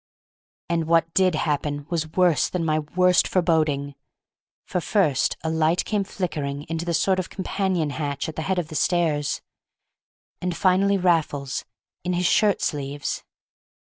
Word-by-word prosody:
And 165 -1 0
what 165 0 +2
did 185 -2 +3
happen 145 -2 -1
was 160 -2 -1
worse 180 -6 +3
than 175 -2 -2
my 155 -1 +2
worst 180 +4 +3
foreboding, 155 -6 +1 0.7
for 180 - -2
first 160 -9 +1
a 160 - -1
light 160 +2 +2
came 210 -2 0
flickering 150 -8 -3
into 165 +2 -4
the 170 - -1
sort 185 +3 +2
of 185 - -3
companion 190 -5 -1
hatch 145 0 -3
at 160 - -6
the - - -3
head 190 - +1
of 170 -3 -2
the - - -8
stairs, 155 -4 +1 1.0
and 180 -1 -2
finally 195 +1 +3
Raffles—in 165 0 -2
his 180 +1 0
shirt 210 +1 +3
sleeves! 145 -1 -3
165 Hz, 150 wpm, -24 LUFS, 150-180 Hz, 1.0 s, did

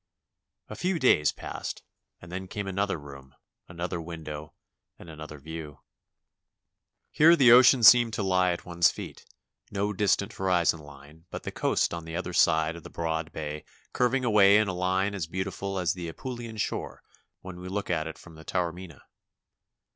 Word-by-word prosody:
A - - -8
few 185 0 -1
days 125 - +4
passed - - -7 0.4
and 85 - -13
then 95 +1 -5
came 100 +2 -5
another 100 0 -1
room, 70 -2 -13 0.3
another 90 0 -4
window, 75 -2 -8 0.4
and - - -13
another 75 -1 -9
view. 75 0 -9 1.3
Here 165 +3 +6
the 130 -7 +6
ocean 125 0 +7
seemed 120 0 +8
to 110 -1 -2
lie 90 -1 +2
at 85 - -5
one's 85 -1 +3
feet; - - -9 0.4
no 105 +1 -2
distant 100 0 +1
horizon 90 -3 +1
Hne 75 +2 -15
but - - -7
the - - -5
coast - - 0
on 85 -1 -6
the 80 0 -7
other 90 0 -4
side 80 -1 +3
of 85 - -9
the - - -11
broad 80 -1 -3
bay 75 -1 -6 0.3
curving 125 +1 +1
away 105 -3 +6
in 110 0 +2
a 95 - -2
line 95 +2 0
as 95 -6 -4
beautiful 95 +2 -4
as 90 -2 0
the 90 -2 -6
Apulian 120 +2 -7
shore - - -4 0.4
when 95 -1 -9
we 90 +1 -8
look 100 0 -3
at 80 -2 -1
it 80 - -8
from 80 -2 -15
Taormina. 90 -2 -4
90 Hz, 170 wpm, -27 LUFS, 80-100 Hz, 1.3 s, seemed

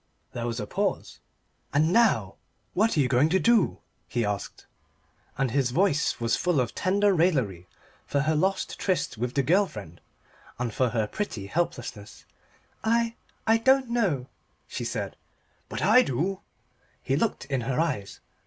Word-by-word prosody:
There 120 0 -3
was 115 0 -3
a - - -3
pause. 195 0 -2 0.5
"And 155 +4 +2
now, 115 - +3 0.4
what 215 -1 +2
are - - +4
you 135 - +3
going 130 +4 +3
to 190 +3 +3
do?" 230 -2 +3 0.3
he 120 -2 -1
asked, 105 -1 -4 0.7
and 135 -2 0
his 135 -1 +1
voice 155 0 +1
was 115 0 +1
full 180 -5 +1
of 120 -2 -1
tender 200 +2 +2
raillery 130 - +1 0.4
for 140 - +1
her 155 +2 +1
lost 190 +5 0
tryst 165 - -1
with 125 +1 -2
the 140 - +2
girl 190 +8 +3
friend, 90 - -10 0.6
and 120 -3 -3
for 130 +1 +2
her 110 -2 0
pretty 110 - -4
helplessness. 120 -6 -4 0.6
"I 230 +1 +2 0.3
I 225 +1 +4
don't 265 +1 +3
know," 185 - +1 0.4
she - - -5
said. - - -4 0.5
"But - - -4
I 250 - +7
do!" 185 - -1 0.6
he 135 - +1
looked 220 +9 -1
in 135 -2 -1
her 125 +4 -1
eyes. 130 -12 -2
145 Hz, 160 wpm, -27 LUFS, 120-195 Hz, 0.7 s, I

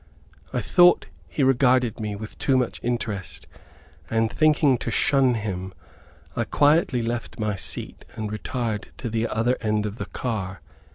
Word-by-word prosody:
I - - -1
thought 175 - +5 0.2
he 90 +10 -1
regarded 125 -3 +3
me 105 -2 -3
with 110 +1 -9
too 135 - +2
much 125 -2 -1
interest, 115 -5 -3 0.6
and 115 -1 +1
thinking 150 -4 +3
to - - -3
shun 130 +1 +3
him, 95 -4 -4 0.6
I 120 - +1
quietly 145 0 +3
left 120 0 -4
my 105 -1 0
seat 95 - -2
and 110 -1 -4
retired 110 0 -3
to 120 - -5
the 115 +1 0
other 120 +3 +1
end 105 -1 0
of 105 +1 -4
the - - -4
car. 95 -8 -4
115 Hz, 155 wpm, -24 LUFS, 105-125 Hz, 0.6 s, thought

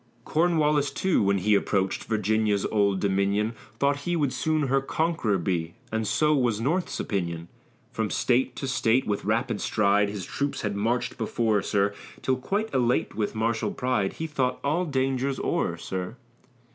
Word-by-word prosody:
Cornwallis, 150 -3 +2
too, 185 +6 +1
when 100 -1 +2
he 105 +3 +2
approach'd 95 -1 +1
Virginia's 110 -1 +1
old 100 -3 +2
dominion, 100 +3 +1 0.2
Thought 140 0 +2
he 175 +5 -2
would 145 -5 0
soon 155 -1 0
her 135 0 +2
conqu'ror 155 - 0
be; 85 -1 -1 0.2
And 110 -1 -1
so 150 +6 +3
was 120 -6 +1
North's 165 +10 -1
opinion. 85 -4 -3 0.4
From - - -2
State 125 +1 +1
to 135 - -4
State 125 -1 +2
with 105 -1 -2
rapid 115 +1 0
stride, 105 -1 +2
His 100 -2 -5
troops 140 0 -2
had 105 -2 -2
march'd 115 +6 -1
before, 110 -2 +1
sir, 100 0 +1 0.3
Till 130 -1 +1
quite 205 +12 -2
elate 125 -1 +1
with 105 0 -2
martial 115 +1 0
pride, 125 -6 0
He 160 - -4
thought 130 -5 -1
all 155 +6 +1
dangers 135 -2 0
o'er, - - -1
sir. 95 +3 -5
115 Hz, 160 wpm, -26 LUFS, 100-140 Hz, 0.4 s, so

